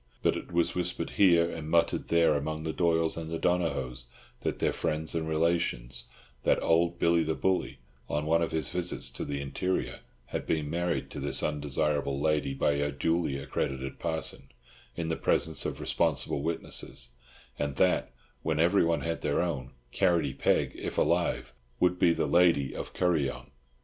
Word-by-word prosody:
But - - +3
it - - -7
was 85 -1 +1
whispered 90 -1 -2
here 85 -4 +5
and 80 -2 -6
muttered 85 0 +2
there 85 -2 +4
among 80 +2 -2
the 80 -1 -2
Doyles 85 -2 +1
and 80 -1 -5
the 80 - -2
Donohoes 70 -9 -1 0.4
and - - -1
their - - +1
friends 80 +1 -2
and 80 -1 -2
relations, 80 -7 0 0.4
that - - +3
old 85 +1 +2
Billy 85 0 +3
the 80 0 -1
Bully, 95 -7 0 0.3
on 75 +1 -1
one 85 +2 +3
of 85 - 0
his 80 -5 -2
visits 90 -8 -1
to 65 - -5
the 70 -1 -3
interior, 70 +7 -2 0.3
had - - -5
been 75 -2 -1
married 85 0 -1
to - - -6
this - - +1
undesirable 75 -1 0
lady 75 -2 +1
by 70 - +2
a 70 0 0
duly 80 0 0
accredited 70 -1 -3
parson, 80 -4 -3 0.5
in 80 -1 -3
the 80 - 0
presence - - +2
of - - -5
responsible 70 -4 0
witnesses; 80 -5 -1 0.5
and 70 -2 -1
that, - - +2 0.3
when 80 -1 -1
everyone 85 -2 +3
had 80 +3 -3
their 70 - 0
own, 70 -8 -3 0.2
Carrotty 80 -4 +2
Peg, - - +1
if - - -6
alive, - - +1 0.3
would 90 0 +2
be 85 - +5
the - - 0
lady 85 -6 +3
of - - -6
Kuryong. 80 -7 0
80 Hz, 170 wpm, -29 LUFS, 70-85 Hz, 0.5 s, here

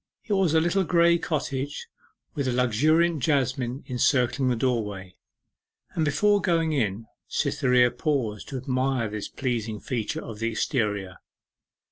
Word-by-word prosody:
It 215 - -1
was 190 -5 +2
a - - +6
little 175 +4 +1
grey 170 -1 +4
cottage 145 -3 -3 0.5
with 140 -2 -2
a - - +1
luxuriant 150 +7 +2
jasmine 130 -2 0
encircling 130 0 +1
the 125 - +1
doorway, 105 -7 -2 0.8
and 160 - 0
before 205 +8 +3
going 165 -3 +1
in 110 -5 -1 0.2
Cytherea 125 -1 +2
paused 120 -9 -2
to 135 - -4
admire 130 -2 -1
this 105 -1 -5
pleasing 115 -5 -3
feature 120 -3 -3
of 110 -2 -8
the 115 0 0
exterior. 105 - -1
130 Hz, 135 wpm, -26 LUFS, 115-155 Hz, 0.8 s, a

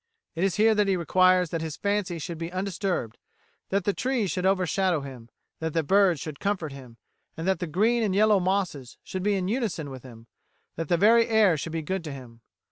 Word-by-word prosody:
It 170 - -2
is 195 -2 +1
here 220 +1 +4
that 210 -1 +2
he 190 -1 +2
requires 185 +1 +3
that 165 - -2
his 160 -2 -5
fancy 200 -4 -1
should 165 +1 -6
be 165 +1 -5
undisturbed, 185 - -3 0.5
that 200 0 0
the 205 - +1
trees 245 -6 -1
should 185 0 0
overshadow 185 -3 +1
him, 130 -4 -10 0.3
that 160 -1 -3
the 165 - +1
birds 190 -1 +3
should 150 0 -7
comfort 190 -7 -2
him, 130 -4 -12 0.4
that 185 +4 -1
the 180 - -3
green 220 +9 +2
and 205 -4 0
yellow 210 0 +4
mosses 180 -9 -2
should 185 - -5
be 205 +1 +1
in 185 -1 -1
unison 200 - -2
with 130 -1 -8
him, 115 -3 -13 0.5
that 165 -1 -5
the 175 - +3
very 230 +5 +5
air 220 -6 +4
should 160 +2 -5
be 165 -1 -2
good 190 +3 -3
to 150 - -5
him. 125 -4 -11
180 Hz, 210 wpm, -26 LUFS, 155-200 Hz, 0.5 s, very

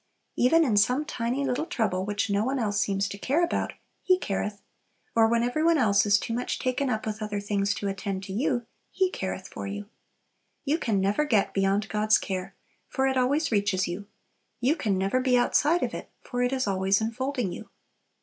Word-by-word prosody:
Even 320 +7 +4
in 220 -6 +1
some 250 +8 +3
tiny 250 +2 -2
little 270 +5 -1
trouble 190 -5 -1
which 205 +2 -1
no 200 0 +1
one 265 +4 -1
else 205 -4 0
seems 200 0 0
to 200 - -7
care 290 +11 +1
about, 345 - -1 0.3
"He 370 -1 +3
careth;" 205 - -3 0.6
or 225 -1 +5
when 235 +1 +2
every 245 +6 0
one 335 0 +4
else 205 -5 +3
is 205 0 +5
too 230 - -4
much 245 +2 -2
taken 255 +2 -1
up 220 -3 -2
with 215 0 -4
other 210 -1 -2
things 200 0 0
to 200 - -3
attend 195 0 -3
to 190 0 -6
you, 240 +2 0 0.2
"He 375 -1 +1
careth 190 - -4
for - - -6
you." 205 +1 -6 0.8
You 305 +4 +1
can 220 -9 0
never 200 +9 +2
get 220 -9 +1
beyond 195 +2 +1
God's 215 0 +3
care, 185 -1 -4 0.3
for 265 - 0
it 265 0 +1
always 275 +5 +1
reaches 200 -3 +1
you; 185 +4 -5 0.5
you 260 +6 +2
can 205 - 0
never 195 +7 +1
be 255 -1 +3
outside 295 +7 +3
of - - -2
it, - - -7
for 245 -1 -3
it 245 0 +1
is 260 -1 0
always 195 0 +2
enfolding 240 -1 -2
you. - - -8
220 Hz, 205 wpm, -27 LUFS, 200-260 Hz, 0.8 s, or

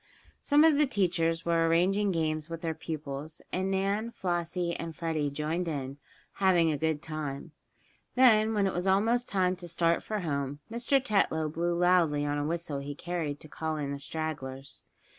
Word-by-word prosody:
Some 295 +1 +4
of 315 -3 +5
the 300 - +4
teachers 170 -7 0
were 165 -1 +2
arranging 190 +5 +2
games 155 -2 -1
with 165 -1 -6
their 165 -1 -1
pupils, 155 -1 -6
and 190 +1 0
Nan, 200 +4 0
Flossie 175 -3 -2
and 165 -1 -6
Freddie 160 -3 -1
joined 155 +5 -2
in, 140 -3 -4 0.4
having 175 -4 +4
a 150 - -1
good 160 -1 0
time. 155 -1 -5 0.6
Then, 225 -4 +5
when 205 -1 +2
it 190 - 0
was 180 +2 -2
almost 225 +6 +2
time 185 -2 +1
to 175 -1 -8
start 170 0 +2
for 215 -2 -3
home, 140 -4 -2
Mr. 240 +4 +2
Tetlow 195 - +1
blew 170 +1 0
loudly 170 -5 +3
on 145 0 -1
a 145 - -1
whistle 165 -3 -2
he 140 +1 -6
carried 160 -4 -3
to - - -11
call 160 +1 -3
in 140 -2 -3
the 140 - -4
stragglers. 140 -3 -5
165 Hz, 180 wpm, -29 LUFS, 155-190 Hz, 0.6 s, of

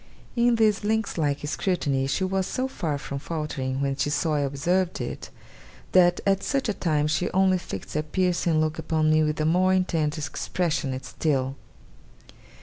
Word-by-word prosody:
In 240 0 +4
this 215 -3 +2
lynx 220 0 0
like 145 -2 -1
scrutiny 145 -6 0
she 165 +7 0
was 190 0 0
so 255 0 -1
far 165 - -3
from 140 0 -5
faltering 140 -4 -3
when 135 -1 0
she 140 +1 0
saw 150 +2 0
I 150 - +1
observed 170 +7 0
it, - - -5 0.6
that 175 -1 +5
at 195 -1 +2
such 275 +4 -1
a 215 - +1
time 155 -6 0
she 155 +3 0
only 190 0 +3
fixed 95 - -7
her 150 - +1
piercing 170 0 +1
look 155 0 0
upon 155 -1 +1
me 155 0 +4
with 150 0 0
a 155 - +1
more 185 +3 +3
intent 165 -5 0
expression 150 -1 -2
still. 135 -4 -1
160 Hz, 170 wpm, -25 LUFS, 145-185 Hz, 0.6 s, that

